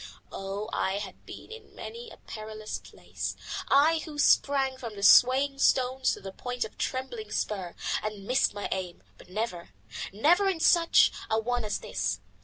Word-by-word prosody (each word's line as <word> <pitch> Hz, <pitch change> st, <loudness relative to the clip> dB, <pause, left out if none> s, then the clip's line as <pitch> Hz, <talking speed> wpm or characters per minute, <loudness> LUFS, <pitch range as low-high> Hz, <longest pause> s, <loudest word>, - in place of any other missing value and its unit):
Oh! 195 Hz, +2 st, -5 dB
I 190 Hz, -, 0 dB
have 200 Hz, -1 st, -6 dB
been -, -, -10 dB
in 455 Hz, 0 st, -12 dB
many 470 Hz, +1 st, -8 dB
a -, -, -13 dB
perilous 215 Hz, 0 st, -7 dB
place, -, -, -6 dB, 0.3 s
I 310 Hz, +4 st, +4 dB
who 310 Hz, -2 st, -8 dB
sprang 275 Hz, -2 st, +3 dB
from 230 Hz, -4 st, -7 dB
the 200 Hz, -, -7 dB
Swaying 275 Hz, +5 st, +6 dB
Stone 260 Hz, -1 st, +2 dB
to -, -, -7 dB
the 195 Hz, -1 st, -8 dB
point 245 Hz, +4 st, -4 dB
of 220 Hz, -, -9 dB
the -, -, -30 dB
Trembling 240 Hz, -5 st, -4 dB
Spur, 190 Hz, -5 st, -3 dB, 0.3 s
and 210 Hz, -2 st, -5 dB
missed 255 Hz, +5 st, +2 dB
my 205 Hz, -, -3 dB
aim, 185 Hz, -2 st, -4 dB, 0.2 s
but -, -, -16 dB
never, 185 Hz, -3 st, -4 dB, 0.4 s
never 345 Hz, -, +3 dB
in 365 Hz, -4 st, -2 dB
such 335 Hz, +1 st, +5 dB, 0.2 s
a 220 Hz, -, +2 dB
one 245 Hz, +1 st, -1 dB
as 210 Hz, -1 st, -1 dB
this. 95 Hz, -2 st, -2 dB
230 Hz, 175 wpm, -28 LUFS, 200-275 Hz, 0.4 s, Swaying